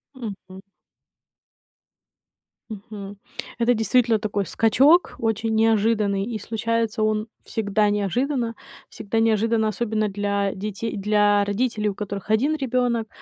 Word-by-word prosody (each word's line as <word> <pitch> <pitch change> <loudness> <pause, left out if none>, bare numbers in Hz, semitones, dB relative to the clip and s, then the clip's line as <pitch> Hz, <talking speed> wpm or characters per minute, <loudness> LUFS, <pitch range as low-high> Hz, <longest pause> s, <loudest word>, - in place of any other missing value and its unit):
Мгм. 200 -5 -8 2.1
Мгм. 205 -1 -9 0.4
Это 235 +1 +3
действительно 230 0 +2
такой 205 -2 -2
скачок 270 - +3
очень 225 0 -1
неожиданный, 215 -2 +2
и 225 -1 -4
случается 225 +1 -2
он 215 0 0 0.2
всегда 210 -1 0
неожиданно. 230 +4 -1 0.3
Всегда 220 +1 -3
неожиданно, 225 0 +2
особенно 215 -1 -1
для 200 0 -1
детей 210 +3 -4
для 205 0 +3
родителей, 210 +1 -1
у 200 - -5
которых 200 -1 -6
1 260 +9 +2
ребёнок. 245 -4 0
215 Hz, 110 wpm, -23 LUFS, 205-230 Hz, 2.1 s, Это